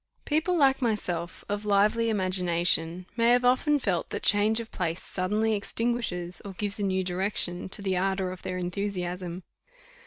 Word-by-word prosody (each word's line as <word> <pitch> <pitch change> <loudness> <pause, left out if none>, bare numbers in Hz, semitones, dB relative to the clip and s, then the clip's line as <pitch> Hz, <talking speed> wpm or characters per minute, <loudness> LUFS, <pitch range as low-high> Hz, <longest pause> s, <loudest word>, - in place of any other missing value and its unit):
People 320 +4 +1
like 270 -3 +4
myself, 180 -7 -2
of 205 +1 -3
lively 210 +3 +3
imagination, 180 -3 +1
may 230 0 +3
have 245 +1 +4
often 260 +4 +3
felt 190 -10 -1
that - - -5
change 215 +2 +3
of 230 -1 -7
place 170 -1 -2
suddenly 210 +4 0
extinguishes, 205 -5 -2
or 200 -2 -7
gives 205 +2 -3
a - - -1
new 190 -1 +1
direction 180 -1 -1
to, 200 - +1
the 190 -1 0
ardour 190 0 0
of 185 - -9
their 185 0 -4
enthusiasm. 180 -1 -3
195 Hz, 160 wpm, -27 LUFS, 180-220 Hz, -, like